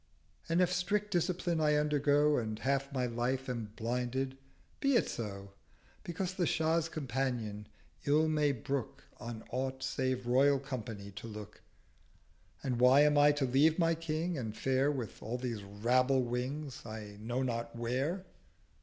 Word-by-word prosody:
And 170 +2 +3
if 180 0 +3
strict 205 +3 0
Discipline 175 -1 0
I 150 -1 +4
undergo 150 0 +3
And 110 -2 -3
half 140 +3 0
my 130 -2 0
Life 125 +2 -1
am 115 -4 -4
blinded—be 130 - -2
it - - +3
so; 100 -3 -5 0.5
Because 180 +2 -3
the 180 -3 0
Shah's 160 0 +1
Companion 120 -8 -2 0.4
ill 150 +2 +4
may 150 -2 +2
brook 135 0 -3
On 115 -2 -7
aught 130 +1 -2
save 130 -2 -1
Royal 135 +3 +4
Company 115 -7 -6
to 105 +3 -8
look. 105 -2 -9 1.0
And 125 -3 -1
why 130 +3 +7
am 150 0 +5
Ito 145 -1 +5
leave 145 +5 +4
my 165 -2 +3
King, 165 0 -2
and 110 -3 -5
fare 135 +2 +2
With 125 -6 -5
all 115 +3 -3
these 120 -4 -3
Rabble 125 +6 +2
Wings 130 +3 -3
I 110 -2 -8
know 120 +4 -1
not 115 -2 -3
where?' 130 +11 -1
130 Hz, 145 wpm, -33 LUFS, 120-150 Hz, 1.0 s, why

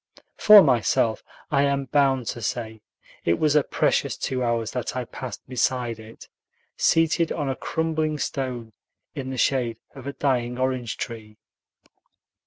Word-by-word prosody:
For 210 -2 +9
myself, 115 -1 +2 0.3
I 140 -2 +3
am 140 -1 0
bound 135 -2 +2
to 120 - -5
say, 110 0 -4 0.4
it 85 - +2
was 155 -1 +2
a 150 - +6
precious - - 0
two 130 -1 -2
hours 115 -2 -1
that 125 -1 -4
I 125 -1 -2
passed 125 +1 -8
beside 125 -2 -1
it, 110 +1 -13 0.5
seated 165 0 +2
on 145 -3 -2
a 135 - -1
crumbling 155 -1 -1
stone 125 -5 -4 0.4
in 135 -4 -5
the 130 - -5
shade 120 -4 +1 0.2
of 135 -1 -10
a 140 - -4
dying 125 -3 -1
orange 130 -3 -2
tree. 110 -2 -7
130 Hz, 150 wpm, -24 LUFS, 115-140 Hz, 0.5 s, For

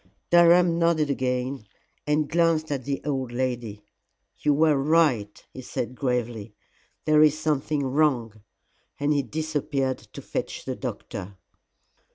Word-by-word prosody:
Durham 175 0 +5
nodded 165 -3 +2
again 125 -3 -2 0.4
and 150 0 +1
glanced 165 -2 +1
at 135 -3 -3
the 140 -1 -3
old 135 -4 -2
lady. 120 -4 -3 0.6
"You 150 - +2
were 155 +1 +4
right," 135 -8 +1
he 130 - -8
said 125 0 -4
gravely, 120 -4 -3 0.5
"there 155 -1 +5
is 155 -1 +5
something 150 -1 -1
wrong," 130 -6 0 0.6
and 145 +1 +1
he 145 - +2
disappeared 145 -3 -2
to - - -12
fetch - - -5
the - - -3
doctor. 95 0 -6
140 Hz, 130 wpm, -25 LUFS, 125-155 Hz, 0.6 s, Durham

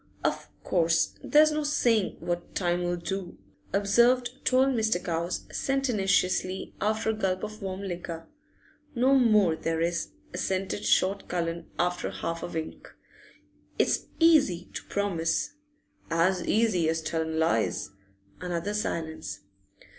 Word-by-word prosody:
'Of - - -1
course 165 -2 +2
there's 305 +1 +5
no 305 0 -1
saying 235 -8 +2
what 175 0 -4
time 175 -1 0
'll 175 0 0
do,' 180 +1 -5 0.3
observed 235 +6 +3
tall 260 +1 +4
Mr. 220 -7 +1
Cowes, 170 +1 -2
sententiously, 200 -8 0
after 220 +1 +1
a - - -2
gulp 190 -4 -1
of 215 +1 -6
warm 190 0 -4
liquor. 175 -3 -5 0.7
'No 255 +3 +4
more 215 -10 +4
there 165 0 -2
is,' 170 +1 -1 0.2
assented 190 +2 -2
short 195 +2 +2
Mr. - - -25
Cullen 170 -1 -2 0.4
with - - -9
half 165 0 -2
a - - -3
wink. 160 -2 -6 0.9
'It's - - +1
easy 280 - +4
to - - -5
promise.' 195 - -1 0.6
'As 170 +2 +2
easy 205 -8 +2
as 160 0 -1
tellin' 160 0 -2
lies.' 115 - +1 0.5
Another 180 +3 -2
silence. 160 - -3
185 Hz, 130 wpm, -28 LUFS, 170-220 Hz, 0.9 s, there's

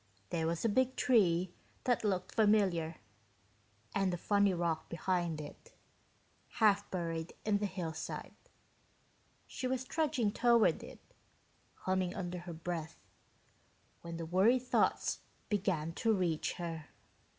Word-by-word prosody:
There 160 -1 0
was 170 +5 -1
a - - +6
big 260 +4 +2
tree 185 -7 +3 0.3
that 245 -3 +1
looked 185 -3 -1
familiar, 195 -7 +3 1.0
and 195 -2 +2
a 175 - -2
funny 200 +2 +3
rock 170 -3 -1
behind 170 -2 -1
it, 145 -1 -10 0.8
half 205 -2 +3
buried 165 -2 -3
in 210 -1 +2
the 205 - 0
hillside. 165 -4 -5 1.1
She 255 - -4
was 260 0 -1
trudging 280 -7 0
toward 235 0 +4
it, - - -10 0.9
humming 185 -1 0
under 180 -2 -4
her 175 0 -7
breath, 165 -1 -4 1.0
when 170 -1 -6
the 165 - -4
worry 190 +9 +4
thoughts 250 0 +1 0.3
began 185 -6 0
to 225 +6 +1
reach 175 -6 0
her. 165 -3 -5
185 Hz, 125 wpm, -34 LUFS, 170-210 Hz, 1.1 s, a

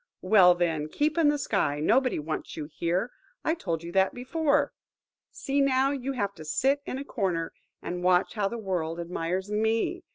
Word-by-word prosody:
Well, 180 -4 +6
then, 160 -3 -1
keep 295 - 0
in 330 -3 +3
the 295 0 +3
sky. 195 - 0
Nobody 255 - +2
wants 155 +2 -5
you 155 - -4
here–I 230 - -3
told 170 - -3
you 170 - -6
that 190 +1 +2
before. 285 +2 +1 0.6
See, 280 +1 -1
now, 270 0 +3
you 275 -1 -3
have 200 -6 -2
to 160 - -11
sit 265 - +1
in 255 - -3
a 275 - -6
corner, 180 -10 -2 0.3
and 180 0 -4
watch 180 +1 +3
how 210 -3 0
the 235 - -4
world 175 -6 -3
admires 180 +3 -3
me! 220 +1 0
200 Hz, 175 wpm, -27 LUFS, 170-270 Hz, 0.6 s, Well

